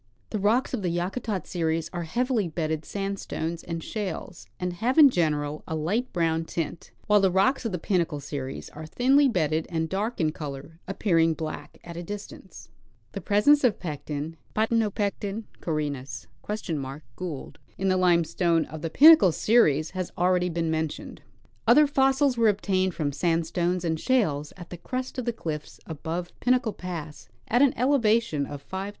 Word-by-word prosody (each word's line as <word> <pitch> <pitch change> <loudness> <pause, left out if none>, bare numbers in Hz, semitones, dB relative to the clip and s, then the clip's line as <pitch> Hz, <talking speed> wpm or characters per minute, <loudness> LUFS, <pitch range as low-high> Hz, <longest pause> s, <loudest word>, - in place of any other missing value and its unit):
The 215 - -1
rocks 220 +8 +2
of 245 - -1
the 180 - 0
Yakutat 185 +4 -2
series 165 -2 -1
are 175 -1 -3
heavily 240 +2 0
bedded 160 -1 -3
sandstones 195 -4 -4
and 165 -1 -5
shales, 190 - -5
and 180 0 -2
have 240 - -1
in 290 -4 +9
general 150 -5 0
a 160 - -3
light 205 +12 -1
brown 165 -2 +1
tint; 165 0 -4 0.2
while 210 0 +5
the 195 -1 +4
rocks 195 +8 +2
of 225 - -1
the 180 - -2
Pinnacle 170 -4 0
series 140 -1 -6
are 155 +1 -9
thinly 270 - +4
bedded 160 -6 0
and 160 -2 -2
dark 210 +5 -2
in 155 -3 +2
color, 150 +1 -8
appearing 165 -5 +2
black 155 0 -6
at 170 -1 -9
a - - -4
distance. 200 0 -9 0.4
The 195 - -6
presence 210 - +4
of 245 -5 +4
a - - -28
Pecten 150 0 -5 0.2
(P. 215 - +2 1.0
caurinus 140 -5 -3
(?) - - -30
Gld.) 155 -4 -5 0.2
in 195 - -1
the 185 - +3
limestone 170 -2 +2
of 155 -1 -9
the 165 - -2
Pinnacle 310 - +8
series 155 - +3
has 185 -1 -3
already 180 0 +2
been 165 -1 -1
mentioned. 160 -1 -3 0.5
Other 280 +6 +7
fossils 270 -1 +2
were 225 -1 +5
obtained 190 -3 0
from 150 -3 -1
sandstones 170 +3 0
and 160 -1 0
shales 155 - +1
at 175 -2 -11
the 175 - -6
crest 255 +8 -4
of 250 - -4
the 240 - +1
cliffs 155 -9 -6
above 165 +3 -5
Pinnacle 250 -3 +2
pass 165 -4 -7 0.2
at 245 +3 +3
an 280 -2 +4
elevation 230 - +2
of 145 -1 -8
5,000 - - -34
feet. 190 +1 -3
175 Hz, 170 wpm, -26 LUFS, 160-210 Hz, 1.0 s, in